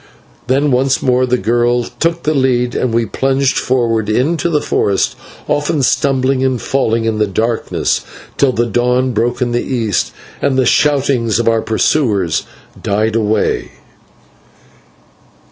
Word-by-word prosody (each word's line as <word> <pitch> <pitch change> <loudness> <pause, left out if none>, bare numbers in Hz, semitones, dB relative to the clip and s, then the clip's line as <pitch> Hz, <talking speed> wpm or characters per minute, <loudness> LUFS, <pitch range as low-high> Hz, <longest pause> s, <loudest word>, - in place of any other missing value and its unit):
Then 140 +3 +2
once 130 +1 +1
more 130 0 +2
the 125 0 +1
girl 120 +1 +1
took 165 +7 -2
the 155 - +1
lead, 125 -3 +1
and 125 - -1
we 115 0 +1
plunged 135 +4 0
forward 115 -4 0
into 155 +10 0
the 150 -3 +1
forest, 100 -8 0 0.3
often 145 -1 0
stumbling 130 0 +1
and 130 -2 0
falling 115 -4 0
in 110 -1 -1
the 105 - +2
darkness, 110 +4 -1 0.3
till 140 -2 +2
the 120 -1 0
dawn 125 +3 +1
broke 120 +3 0
in 120 - -2
the 120 - 0
east, 110 - -1 0.3
and 130 - +1
the 130 - +2
shoutings 135 -5 +2
of 115 - -1
our 115 -1 +3
pursuers 110 - 0 0.3
died 110 +2 0
away. 110 -1 0
125 Hz, 145 wpm, -15 LUFS, 115-135 Hz, 0.3 s, our